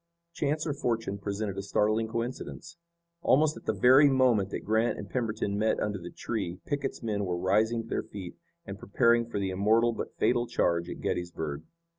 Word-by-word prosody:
Chance 155 Hz, 0 st, -1 dB
or 150 Hz, -, -1 dB
fortune 115 Hz, -7 st, -2 dB
presented 100 Hz, 0 st, -3 dB
a -, -, -2 dB
startling 110 Hz, +3 st, +1 dB
coincidence. 120 Hz, +8 st, -5 dB, 0.5 s
Almost 155 Hz, +1 st, +3 dB
at -, -, -12 dB
the -, -, +2 dB
very 135 Hz, +4 st, +6 dB
moment 125 Hz, -7 st, +3 dB
that -, -, -5 dB
Grant 110 Hz, +2 st, +1 dB
and 100 Hz, -, -7 dB
Pemberton 110 Hz, -3 st, -2 dB
met 110 Hz, +1 st, +1 dB
under 105 Hz, -2 st, -2 dB
the 85 Hz, 0 st, -8 dB
tree 95 Hz, -6 st, -4 dB
Pickett's 140 Hz, -3 st, -3 dB
men 105 Hz, -3 st, -1 dB
were 90 Hz, -2 st, -2 dB
rising 110 Hz, +6 st, +1 dB
to -, -, -13 dB
their -, -, -1 dB
feet 95 Hz, -4 st, -9 dB, 0.3 s
and 100 Hz, 0 st, -7 dB
preparing 115 Hz, +4 st, +2 dB
for -, -, -4 dB
the 95 Hz, -1 st, -1 dB
immortal 110 Hz, +5 st, +3 dB
but -, -, -6 dB
fatal 120 Hz, -1 st, +2 dB
charge 85 Hz, -3 st, 0 dB
at -, -, -7 dB
Gettysburg. 80 Hz, -4 st, -3 dB
110 Hz, 185 wpm, -29 LUFS, 100-120 Hz, 0.5 s, very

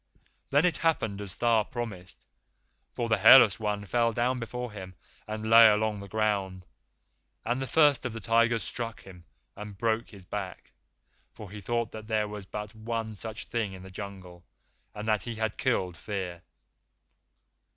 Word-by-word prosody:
Then 145 Hz, +4 st, +3 dB
it 170 Hz, -5 st, +2 dB
happened 110 Hz, -11 st, 0 dB
as 95 Hz, -3 st, -7 dB
Tha 115 Hz, -2 st, +3 dB
promised, 105 Hz, -7 st, -6 dB, 0.7 s
for 120 Hz, -, -3 dB
the 110 Hz, -2 st, +2 dB
Hairless 110 Hz, -2 st, +8 dB
One 105 Hz, -1 st, -2 dB
fell 115 Hz, +3 st, +1 dB
down 125 Hz, +3 st, 0 dB
before 125 Hz, +1 st, -5 dB
him 95 Hz, -3 st, -9 dB, 0.3 s
and 110 Hz, 0 st, -4 dB
lay 115 Hz, 0 st, +9 dB
along 105 Hz, 0 st, +2 dB
the 100 Hz, -, -9 dB
ground, 100 Hz, -3 st, -1 dB, 0.8 s
and 120 Hz, +3 st, -1 dB
the 135 Hz, -, -3 dB
First 145 Hz, -4 st, +4 dB
of 130 Hz, -, -2 dB
the 115 Hz, -, -6 dB
Tigers 115 Hz, +1 st, +2 dB
struck 115 Hz, -3 st, -5 dB
him 90 Hz, -3 st, -14 dB, 0.3 s
and 105 Hz, -1 st, -9 dB
broke 115 Hz, +1 st, 0 dB
his 100 Hz, -4 st, -13 dB
back, 95 Hz, -1 st, -6 dB, 0.6 s
for 105 Hz, -3 st, -11 dB
he 105 Hz, 0 st, -8 dB
thought 115 Hz, +2 st, -1 dB
that 110 Hz, -1 st, -9 dB
there 110 Hz, -2 st, 0 dB
was 105 Hz, -2 st, -7 dB
but 105 Hz, +2 st, -6 dB
one 110 Hz, 0 st, -4 dB
such 110 Hz, +1 st, -6 dB
Thing 115 Hz, -4 st, -2 dB
in 95 Hz, -1 st, -10 dB
the 95 Hz, -, -11 dB
Jungle, 95 Hz, -3 st, -9 dB, 0.5 s
and 105 Hz, +1 st, -6 dB
that 110 Hz, -1 st, +2 dB
he 120 Hz, -1 st, -5 dB
had 110 Hz, -1 st, -2 dB
killed 95 Hz, -9 st, 0 dB
Fear. 90 Hz, 0 st, -5 dB
110 Hz, 170 wpm, -28 LUFS, 100-115 Hz, 0.8 s, lay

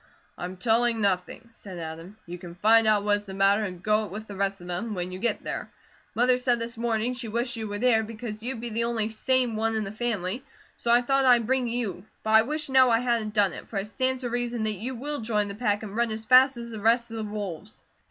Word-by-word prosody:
"I'm 180 Hz, +1 st, -6 dB
telling 230 Hz, +3 st, +2 dB
nothing," 195 Hz, +2 st, -1 dB
said 195 Hz, -5 st, -10 dB
Adam. 165 Hz, +4 st, -8 dB
"You 175 Hz, +1 st, -8 dB
can 175 Hz, -1 st, -10 dB
find 220 Hz, +4 st, +5 dB
out 210 Hz, -2 st, +4 dB
what 205 Hz, 0 st, +3 dB
is 205 Hz, -, -10 dB
the 190 Hz, -1 st, -8 dB
matter 195 Hz, +2 st, +4 dB
and 180 Hz, -3 st, -6 dB
go 215 Hz, 0 st, +2 dB
it -, -, -9 dB
with 210 Hz, +4 st, -7 dB
the 205 Hz, -, -9 dB
rest 195 Hz, 0 st, -1 dB
of 175 Hz, -, -12 dB
them, 205 Hz, +5 st, -3 dB
when 180 Hz, 0 st, -3 dB
you 185 Hz, -, -6 dB
get 235 Hz, -, 0 dB
there. -, -, -4 dB, 0.5 s
Mother 250 Hz, +1 st, +3 dB
said 250 Hz, -1 st, +2 dB
this 230 Hz, +1 st, -4 dB
morning 230 Hz, +1 st, -1 dB
she 245 Hz, -2 st, -6 dB
wished 235 Hz, +3 st, -1 dB
you 220 Hz, -1 st, -4 dB
were 205 Hz, 0 st, -4 dB
there, 230 Hz, 0 st, +3 dB
because 220 Hz, 0 st, -7 dB
you'd 240 Hz, 0 st, -4 dB
be 240 Hz, -, -3 dB
the 230 Hz, +1 st, 0 dB
only 225 Hz, -2 st, -1 dB
SANE 245 Hz, +1 st, +1 dB
one 225 Hz, +1 st, 0 dB
in 220 Hz, -, 0 dB
the 195 Hz, -, -5 dB
family, 215 Hz, 0 st, -2 dB, 0.3 s
so 235 Hz, -, -4 dB
I 240 Hz, +1 st, +5 dB
thought 270 Hz, +2 st, +2 dB
I'd 240 Hz, -3 st, +5 dB
bring 260 Hz, +1 st, +1 dB
you; 225 Hz, -7 st, -3 dB, 0.2 s
but 220 Hz, -, -1 dB
I 220 Hz, 0 st, +8 dB
wish 300 Hz, +6 st, -2 dB
now 260 Hz, -1 st, +5 dB
I 230 Hz, -, +4 dB
hadn't 230 Hz, -3 st, -1 dB
done 200 Hz, -3 st, +3 dB
it, -, -, -9 dB
for 210 Hz, -, -5 dB
it 195 Hz, -, -1 dB
stands 260 Hz, +4 st, -1 dB
to 245 Hz, -2 st, -3 dB
reason 240 Hz, -1 st, -2 dB
that 215 Hz, 0 st, 0 dB
you 235 Hz, +7 st, -5 dB
will 290 Hz, +4 st, -3 dB
join 210 Hz, -2 st, 0 dB
the 200 Hz, -, -5 dB
pack, 210 Hz, -1 st, -1 dB
and 205 Hz, -1 st, -7 dB
run 235 Hz, 0 st, +1 dB
as 220 Hz, 0 st, -5 dB
fast 255 Hz, +2 st, +6 dB
as 235 Hz, 0 st, -7 dB
the 220 Hz, -, -6 dB
rest 235 Hz, +2 st, +2 dB
of 225 Hz, -, -5 dB
the 220 Hz, -, -3 dB
wolves." 200 Hz, -1 st, -6 dB
220 Hz, 260 wpm, -26 LUFS, 205-240 Hz, 0.5 s, I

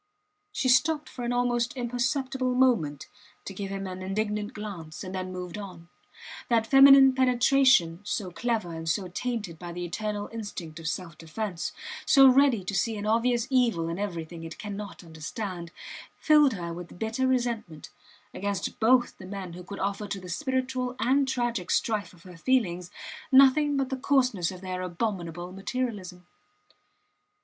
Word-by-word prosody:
She 265 Hz, -, -1 dB
stopped 300 Hz, +4 st, +3 dB
for 250 Hz, -, -7 dB
an 240 Hz, -, -1 dB
almost 245 Hz, +2 st, 0 dB
imperceptible 255 Hz, +1 st, -1 dB
moment 225 Hz, -, +2 dB, 0.4 s
to 195 Hz, -, -6 dB
give 195 Hz, 0 st, -5 dB
him 195 Hz, 0 st, -4 dB
an 185 Hz, 0 st, -6 dB
indignant 210 Hz, +2 st, -2 dB
glance, 190 Hz, -7 st, -7 dB
and 185 Hz, 0 st, -7 dB
then 185 Hz, -1 st, -4 dB
moved 180 Hz, +1 st, -6 dB
on. 175 Hz, -4 st, -10 dB, 0.6 s
That 230 Hz, -2 st, +3 dB
feminine 270 Hz, +1 st, +8 dB
penetration 255 Hz, -8 st, +4 dB
so 205 Hz, -2 st, -3 dB
clever 215 Hz, -1 st, -2 dB
and 165 Hz, 0 st, -4 dB
so 185 Hz, +2 st, -1 dB
tainted 210 Hz, -5 st, -4 dB
by 175 Hz, -1 st, -7 dB
the 175 Hz, 0 st, -4 dB
eternal 205 Hz, +3 st, -3 dB
instinct 180 Hz, -8 st, -7 dB
of 165 Hz, -, -6 dB
self 165 Hz, 0 st, -4 dB
defence, 175 Hz, +2 st, -4 dB, 0.3 s
so 270 Hz, -2 st, +7 dB
ready 260 Hz, -5 st, +5 dB
to 185 Hz, -, -4 dB
see 220 Hz, +3 st, 0 dB
an 205 Hz, -, -5 dB
obvious 235 Hz, +2 st, +2 dB
evil 230 Hz, -11 st, +2 dB
in 170 Hz, +3 st, -4 dB
everything 170 Hz, -4 st, -5 dB
it 165 Hz, 0 st, -8 dB
cannot 205 Hz, -2 st, -7 dB
understand 170 Hz, +2 st, -6 dB, 0.5 s
filled 300 Hz, -4 st, +5 dB
her 170 Hz, -4 st, -5 dB
with 175 Hz, +1 st, -9 dB
bitter 225 Hz, +6 st, -1 dB
resentment 235 Hz, -11 st, -2 dB, 0.4 s
against 200 Hz, -1 st, -3 dB
both 240 Hz, +2 st, +3 dB
the 185 Hz, -, -9 dB
men 190 Hz, -3 st, -6 dB
who 180 Hz, +1 st, -9 dB
could 200 Hz, +2 st, -8 dB
offer 200 Hz, +2 st, -2 dB
to 195 Hz, -, -4 dB
the 180 Hz, -1 st, -10 dB
spiritual 260 Hz, -, -2 dB
and 265 Hz, +4 st, +2 dB
tragic 240 Hz, -8 st, -1 dB
strife 215 Hz, -3 st, 0 dB
of 170 Hz, -2 st, -19 dB
her 180 Hz, -2 st, -12 dB
feelings 180 Hz, -6 st, 0 dB, 0.4 s
nothing 275 Hz, +2 st, +6 dB
but 270 Hz, -1 st, 0 dB
the -, -, 0 dB
coarseness 255 Hz, -10 st, +2 dB
of 185 Hz, -1 st, -9 dB
their 185 Hz, -1 st, -4 dB
abominable 175 Hz, -2 st, -3 dB
materialism. 195 Hz, -3 st, -4 dB
210 Hz, 160 wpm, -27 LUFS, 180-250 Hz, 0.6 s, feminine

